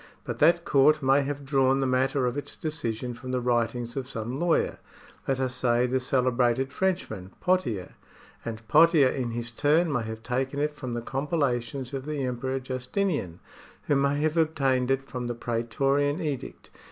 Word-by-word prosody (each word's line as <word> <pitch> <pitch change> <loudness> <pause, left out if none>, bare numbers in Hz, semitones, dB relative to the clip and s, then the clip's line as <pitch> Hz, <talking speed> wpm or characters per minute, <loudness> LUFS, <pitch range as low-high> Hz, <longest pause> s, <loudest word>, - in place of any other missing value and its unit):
But - - -5
that 170 +3 +4
court 150 +2 +4
may 135 +2 +4
have 140 0 -4
drawn 135 -1 +3
the 135 - +1
matter 130 +1 +1
of 125 +1 -1
its 145 - -4
decision 125 -6 -3
from 130 +2 -9
the 125 0 0
writings 120 -1 -1
of 130 -2 -4
some 120 +2 -4
lawyer, 170 -1 +1 0.5
let 135 -1 0
us 130 -1 -1
say 120 -1 +2
the 130 +1 +1
celebrated 130 0 +1
Frenchman, 110 - -2
Pothicr; 125 - 0 0.5
and 110 -1 -6
Pothier 155 -1 +6
in 130 -3 -2
his 115 0 -4
turn 155 +7 +2
may 125 - +1
have 110 0 -6
taken 130 +3 -2
it 150 +1 0
from 130 -4 -5
the 120 - -4
compila 135 -1 0
tions 130 +2 -7
of 135 -1 -4
the 150 -2 -2
Emperor 130 +2 -2
Justinian, 130 - -2 0.4
who 145 - +1
may 140 +1 +2
have 155 +1 0
obtained 135 -6 +2
it 135 0 0
from 125 -2 -4
the 120 - -3
praetorian 135 +6 0
edict. 150 -7 -5
130 Hz, 175 wpm, -27 LUFS, 120-145 Hz, 0.5 s, Pothier